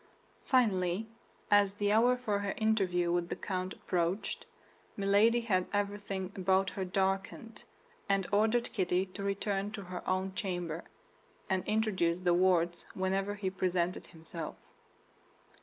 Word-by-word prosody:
Finally, 200 -6 +2 0.5
as 205 -1 +5
the 205 0 0
hour 240 +4 +4
for 215 -5 -1
her 200 -1 -2
interview 190 -6 +2
with 175 0 0
the - - -2
count 185 -1 -3
approached, 180 +2 -2 0.5
Milady 205 +4 +4
had 185 -6 +1
everything 200 -2 -2
about 190 0 +2
her 195 - -3
darkened, 195 +4 -2 0.4
and 195 -1 +2
ordered 220 +3 +2
Kitty 185 -2 +1
to 195 +1 -9
return 200 0 -1
to 205 -2 -5
her 180 0 -6
own 190 +1 0
chamber, 175 -5 -3 0.7
and 185 -1 +1
introduce 210 -6 +1
De 180 -1 +2
Wardes 175 -1 +2
whenever 195 +2 0
he 195 -2 -2
presented 180 -1 -1
himself. 165 -1 -7
195 Hz, 130 wpm, -32 LUFS, 180-205 Hz, 0.7 s, as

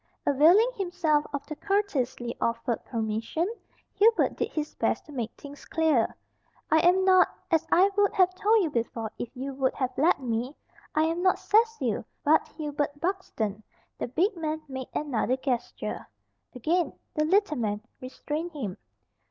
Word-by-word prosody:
Availing 340 - +5
himself 335 -6 +1
of 285 -1 -4
the 305 - -6
courteously 295 - -1
offered 230 +1 -1
permission, 225 +8 -2 0.5
Hubert 450 +2 +3
did - - -2
his 305 -1 -3
best - - -1
to 300 - -13
make 240 -5 -3
things 285 0 -11
clear. 310 -8 +1 0.6
"I 315 - +6
am 360 +3 +4
not 370 -1 +6 0.2
as 325 0 +2
I 370 +3 +6
would 410 -1 +3
have 370 -2 +4
told 420 +3 +3
you 320 - -1
before 230 -3 -2
if 240 - -4
you 270 +2 -5
would 265 -1 0
have 255 -1 -2
let 315 +6 +3
me 245 +2 -2 0.4
I 310 - +4
am 330 +2 0
not 370 0 +3
Cecil, 430 - +1 0.2
but 305 +2 +4
Hubert 290 -2 -3
Buxton." 265 - -2 0.4
The - - -2
big 365 - +1
man 315 -1 -3
made 265 -2 -6
another 260 -3 0
gesture. 250 -3 -3 0.5
Again 325 +5 0 0.2
the 305 - +1
little 375 -1 +2
man 210 -2 -1 0.2
restrained 300 +6 -5
him. 215 -11 -5
300 Hz, 155 wpm, -27 LUFS, 250-355 Hz, 0.6 s, I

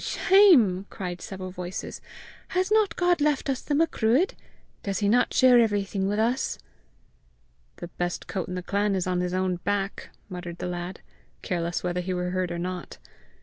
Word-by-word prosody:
Shame!" 255 - +5
cried 180 -2 -6
several 185 -1 -6
voices. 180 0 -6 0.5
"Has 370 +2 -1
not 430 -2 +3
God 355 -3 +2
left 290 -1 +1
us 260 - -3
the 290 - -1
Macruadh? 295 - +2 0.5
Does 195 -2 -2
he 205 - 0
not 240 +4 +3
share 250 -2 +6
everything 200 -3 +1
with 205 +1 -1
us?" 235 +4 0 1.2
"The 175 - -7
best 175 +1 -4
coat 190 -3 -4
in 180 - -5
the 180 - -4
clan 200 +1 0
is 185 - -1
on 180 -1 0
his 180 0 -2
own 185 -1 0
back!" 200 +2 -3 0.2
muttered 175 -2 -7
the - - -5
lad, 175 +1 -5 0.4
careless 170 -1 -2
whether 180 0 -1
he 185 +1 -3
were 180 0 -2
heard 185 -1 -1
or 170 - -3
not. 180 0 -5
190 Hz, 175 wpm, -26 LUFS, 180-240 Hz, 1.2 s, share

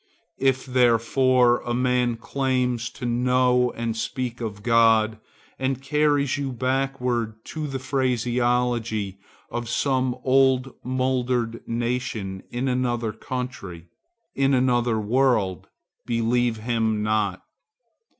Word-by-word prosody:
If 135 -1 +1
therefore 125 0 +3
a 120 0 -2
man 125 -1 +1
claims 125 -1 -1
to - - -8
know 125 +1 +2
and 115 -1 -3
speak 120 +2 -4
of 105 -3 -5
God 115 -2 +4 0.4
and 130 -1 -1
carries 145 0 +1
you 135 -2 -2
backward 125 -3 -1 0.2
to 155 -2 -3
the 135 -1 -3
phraseology 120 -5 0 0.3
of 120 -1 -4
some 130 0 0
old 130 0 +3
mouldered 125 -2 -1
nation 115 -5 -3
in 125 +2 -2
another 120 -3 -1
country, 110 -9 -6 0.4
in 135 0 +2
another 120 -3 +2
world, 110 -5 +1 0.4
believe 120 0 +1
him 110 -1 0
not. 105 -3 0
125 Hz, 105 wpm, -24 LUFS, 115-130 Hz, 0.4 s, God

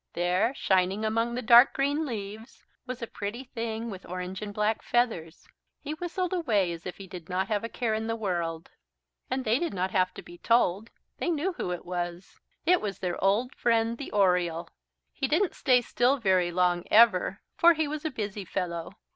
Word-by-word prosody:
There, 180 +8 +1
shining 190 +1 +1
among 230 +2 0
the 250 - -3
dark 240 +3 +7
green 285 +3 0
leaves, 220 0 -7 0.2
was 250 -1 -5
a - - 0
pretty 215 +3 -6
thing 230 -2 -4
with 190 -1 -8
orange 185 +2 -6
and 210 -1 -5
black 210 +1 0
feathers. 220 -10 -1 0.3
He 300 +1 -5
whistled 355 +2 -3
away 215 - +1
as 170 +1 -7
if 180 - -7
he 195 - -9
did 175 -2 -10
not 185 +1 -1
have 210 -1 0
a 230 - -3
care 230 -2 -1
in 220 +1 -2
the 225 - -1
world. 170 -6 -3 0.6
And 260 0 -2
they 225 +4 +2
did 340 -12 -2
not 185 0 -1
have 185 -1 +2
to - - -9
be 175 0 -13
told 225 -2 +2 0.3
they - - -1
knew 345 +3 0
who 180 - -4
it 175 - -5
was. 175 0 -5 0.3
It 360 0 +4
was 200 -2 -3
their 180 -1 -3
old 215 +6 +2
friend, 230 0 +1
the 280 - -6
Oriole. 180 -4 +1 0.4
He 270 - -1
didn't 335 +7 +1
stay 250 -3 +3
still 245 +3 +2
very 185 -6 +2
long 175 0 +1
ever, 205 -4 +5 0.2
for 340 0 +6
he 315 -1 0
was 300 0 -5
a 315 - -1
busy 210 -6 -4
fellow. 170 -2 -4
215 Hz, 195 wpm, -28 LUFS, 185-245 Hz, 0.6 s, dark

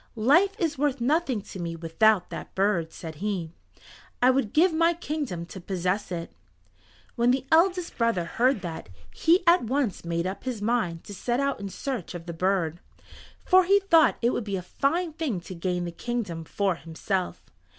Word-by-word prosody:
"Life 300 - +4
is 320 -5 -1
worth 285 -2 +1
nothing 265 -2 +1
to 190 - -9
me 170 -1 -4
without 175 +5 +2
that - - -8
bird," 190 -5 +1
said 160 -3 -8
he. 190 -4 -3 0.7
"I 250 +1 +5
would 255 -5 0
give 335 +3 +4
my 335 +1 +3
kingdom 290 - -4
to 185 +2 -10
possess 185 +2 -2
it." 170 -1 -4 0.8
When 240 +1 +2
the 260 +1 +1
eldest 355 0 +2
brother 230 -7 +1
heard 245 +5 +1
that, 165 - -6 0.2
he 340 - +3
at 340 -6 +5
once 255 -4 -1
made 170 0 -2
up 190 +2 -4
his 255 -4 -3
mind 205 -7 -1
to 205 - -9
set 240 +5 -1
out 280 -3 0
in 200 -1 -5
search 225 - -5
of 170 -1 -7
the 170 - -5
bird, 175 -2 0 0.7
for 370 0 +6
he 400 +3 +5
thought 335 -5 +4
it 240 - +4
would - - -2
be 200 -2 -3
a 180 - -6
fine 320 - -1
thing 295 - -2
to 185 - -9
gain 180 0 -2
the 170 - -4
kingdom 185 -5 -4
for 195 0 -1
himself. 175 +3 -3
210 Hz, 185 wpm, -26 LUFS, 175-280 Hz, 0.8 s, for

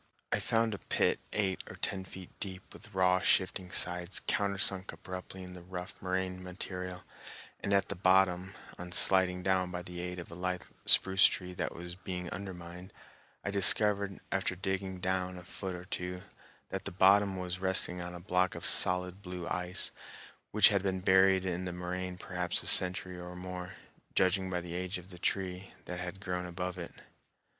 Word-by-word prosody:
I - - +2
found 115 -1 +1
a 100 - -5
pit - - +1
eight 95 -3 0
or - - -8
ten 95 -1 -3
feet 95 -1 -10
deep 95 -1 -5
with 110 - -14
raw 95 -1 +3
shifting 95 0 +2
sides 90 0 +1
countersunk 100 -1 +1
abruptly 95 0 -8
in 90 0 -9
the 90 - -10
rough 90 +1 -8
moraine 95 0 -2
material, 90 0 -6 0.6
and - - -3
at 100 -1 +3
the 100 - -4
bottom, 95 +1 +3 0.2
on 90 0 -6
sliding 90 -1 +4
down 95 -1 +2
by 90 0 -5
the 90 0 -7
aid 90 0 -5
of 85 -1 -8
a - - -8
lithe 90 +1 -3 0.2
spruce 95 0 +6
tree 90 -1 0
that - - -3
was 85 +1 -7
being 90 -1 -5
undermined, 90 -1 -7 0.5
I 100 - -1
discovered, 100 0 +6
after 95 -1 0
digging 95 0 -3
down 95 0 -1
a 90 - -9
foot 95 +1 -6
or 90 0 -9
two, 90 0 -4 0.5
that - - -4
the - - -4
bottom 95 +1 +4
was 90 0 -4
resting 95 -1 0
on 90 0 -6
a - - -7
block 90 +1 +1
of - - -1
solid 90 +1 +2
blue 90 -2 -6
ice 90 +1 -1 0.6
which 105 -1 +7
had 100 -3 +2
been 95 -1 -1
buried 95 0 +5
in 90 0 -2
the 90 - -3
moraine 90 +1 -4
perhaps 90 -1 -2
a - - -6
century 90 0 +4
or 90 0 -8
more, 90 0 -6 0.4
judging 95 0 +2
by 90 -1 -1
the 85 0 -7
age 90 +1 -3
of 90 +1 -12
the 90 - -11
tree 95 0 -2
that 90 0 -5
had 90 +2 -6
grown 90 -1 -3
above 90 +1 -4
it. 85 - -6
90 Hz, 185 wpm, -32 LUFS, 90-95 Hz, 0.6 s, which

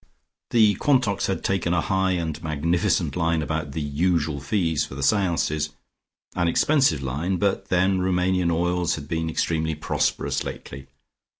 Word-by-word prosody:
The 110 -3 +5
Quantocks 125 -9 +2
had 95 - -2
taken 90 -2 0
a 85 - +2
high 95 +3 +1
and 80 -3 -3
magnificent 80 +3 0
line 85 -2 +1
about 75 -2 -3
the 80 - -3
"usual 75 0 0
fees" 80 0 0
for - - -8
the 70 - -4
seances, 80 -5 +1 0.7
an 85 -1 +1
expensive 110 - +2
line, 80 +9 -2
but 100 +1 0
then 95 +1 +2
Roumanian 90 -1 +1
oils 90 +1 0
had 70 -2 -8
been 80 0 -2
extremely 80 -1 -1
prosperous 75 - -1
lately. 65 +1 -8
85 Hz, 145 wpm, -24 LUFS, 80-95 Hz, 0.7 s, The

